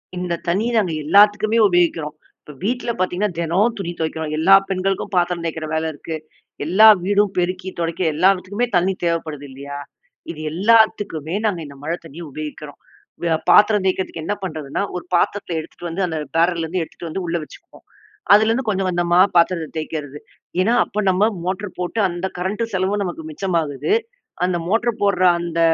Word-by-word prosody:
இந்த 180 -1 -3
தண்ணிய 200 +7 +1
நாங்க 180 -6 -1
எல்லாத்துக்குமே 210 +5 +4
உபயோகிக்கிறோம். 170 -4 +1 0.3
இப்ப - - -12
வீட்ல 245 +3 -1
பார்த்தீங்கன்னா, 185 +3 0
தினம் 185 +8 +1
துணி 185 -4 -4
துவைக்கிறோம். 160 -1 -3
எல்லா 165 +5 +5 0.2
பெண்களுக்கும் 195 +1 -2
பாத்திரம் 175 -1 +1
தேய்க்கிற 160 -1 -3
வேல 160 0 0
இருக்கு. 160 +3 -6 0.5
எல்லா 195 +7 +6 0.2
வீடும் 200 +1 +2
பெருக்கி 185 +1 -1
துடைக்க, 170 +1 -2
எல்லாவற்றுக்குமே 190 +6 +2
தண்ணி 180 +2 +2
தேவைப்படுது 160 -4 -2
இல்லையா? 140 +2 -8 0.5
இது 155 - -10
எல்லாத்துக்குமே 195 -4 +2
நாங்க 200 -5 0
இந்த 140 -1 -11
மழை 165 +3 -1
தண்ணிய 165 +2 -10
உபயோகிக்கிறோம். 150 -1 -8 0.4
வ 165 -1 +2
பாத்திரம் 210 -1 +5
தேய்க்கிறதுக்கு 185 -3 -1
என்ன 205 - 0
பண்ணுறதுன்னா, 155 -1 -3
ஒரு 180 - -5
பாத்திரத்துல 175 -1 0
எடுத்துட்டு 170 +2 -8
வந்து 185 +3 -1
அந்த 160 -2 -3 0.2
பேரல்லேருந்து 170 0 +1
எடுத்துட்டு 165 +1 -9
வந்து 190 +4 -4
உள்ள 170 +1 0
வச்சுக்குவோம். - - -16 0.5
அதுலேருந்து 225 +4 +3
கொஞ்சம், 195 -2 0
கொஞ்சமா 175 0 +2 0.2
பாத்திரத்த 170 -2 +2
தேய்க்கிறது. 150 -2 -5 0.4
ஏன்னா, 220 +6 +2
அப்ப 210 +1 -3
நம்ம 195 +4 +3 0.2
மோட்டரு 190 +2 -3
போட்டு 180 +5 -1
அந்த 175 +2 -3
கரண்டு 205 +5 -1
செலவும் 190 +2 0
நமக்கு 175 -4 -5
மிச்சமாகுது. 165 - -1 0.5
அந்த 180 -1 0
மோட்டரு 230 +3 +1
போடுற 200 -2 +2 0.2
அந்த 170 -1 -3
180 Hz, 155 wpm, -20 LUFS, 165-200 Hz, 0.5 s, எல்லா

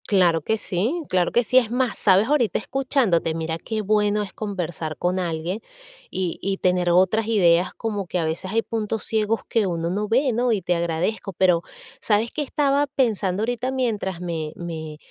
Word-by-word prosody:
Claro 175 -5 +3
que 220 +8 0
sí, 220 - -1
claro 180 -1 +2
que 240 - +3
sí. 255 - +2
Es 240 -4 +4
más, 250 0 0
¿sabes? 195 +2 +4
Ahorita 260 -8 +2
escuchándote, 235 - +1
mira 160 0 -2
qué 220 +3 -3
bueno 210 0 +2
es 200 - -9
conversar 175 -6 -4
con 180 +1 0
alguien 175 +3 -3 0.5
y 185 -3 -3
y 195 0 -1
tener 180 -1 +1
otras 190 +5 +3
ideas. 180 -5 +3
Como 205 -4 -3
que 180 - -2
a 165 - 0
veces 165 +4 -3
hay 225 +1 +1
puntos 220 -1 -3
ciegos 220 0 0
que 220 -4 +1
uno 170 -1 -2
no 210 +3 -1
ve, 255 +4 +2
¿no? 245 +2 +1
Y 210 -4 +1
te 175 0 +1
agradezco. 170 +5 -2
Pero, 180 -1 +3 0.4
¿sabes 220 +2 +1
qué 305 - -3
estaba 285 0 +1
pensando 215 -8 0
ahorita 245 +2 -1
mientras 215 -9 -2
me 160 -3 -4
me 160 -3 -6
200 Hz, 185 wpm, -23 LUFS, 175-225 Hz, 0.5 s, Es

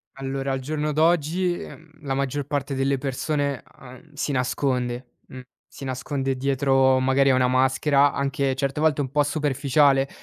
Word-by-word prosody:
Allora 135 0 -4
al 135 - -1
giorno 150 +3 -3
d'oggi, 165 +3 +2
uhm, 160 0 -12
la 135 -2 -2
maggior 140 +1 -2
parte 140 -1 -2
delle 135 +1 0
persone, 140 +1 -2 0.2
uhm, 135 +4 -14
si 145 0 -2
nasconde, 125 -1 -1 0.2
uhm, 130 - -9 0.3
si - - -10
nasconde 135 +1 -3
dietro 135 0 +2
magari 135 +1 +3
a 130 - +4
una 125 - +3
maschera, 135 +3 +3
anche 140 -1 -1
certe 140 +1 -2
volte 155 -2 +2
un 135 -1 -3
po' 150 - +3
superficiale, 145 -1 +2
135 Hz, 160 wpm, -24 LUFS, 130-145 Hz, 0.3 s, a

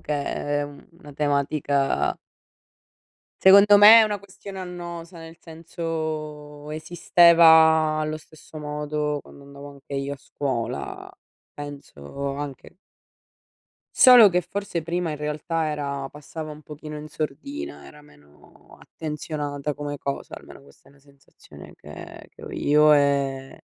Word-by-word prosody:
che 150 - -5
è 145 0 -2
è - - -1
u 145 0 -12
una 145 -5 -13
tematica 140 -1 0 1.3
secondo 200 +2 +8
me 210 +3 +9
è - - +7
una 210 -2 -3
questione 195 0 -11
annosa, 175 -1 -8
nel 165 0 -12
senso 155 -3 -6
esisteva 160 -1 +5
allo 155 0 -2
stesso 155 0 -16
modo 150 0 -3
quando 140 - -16
andavo 140 0 -12
anche 140 0 -11
io 140 +1 -3
a - - -6
scuola. 130 -4 -5 0.4
Penso 140 - -7
anche 145 +3 -8 1.2
solo 245 -5 +8
che 180 0 +1
forse 180 -1 -5
prima 170 +1 -2
in 150 - -4
realtà 155 +2 -3
era 140 -2 -4
passava 155 +2 -9
un 150 0 -11
pochino 150 0 -9
in 150 +1 -9
sordina, 280 - -6
era 150 - -15
meno 75 - -21
attenzionata 150 -2 -5
come 145 0 -6
cosa, 140 0 -5
almeno - - -13
questa 70 0 -22
è - - -21
una 140 - -24
sensazione 140 0 -17
che - - -12
che - - -17
ho - - -8
io, 150 +1 +3
ehm, 140 -2 0
150 Hz, 135 wpm, -23 LUFS, 145-165 Hz, 1.3 s, me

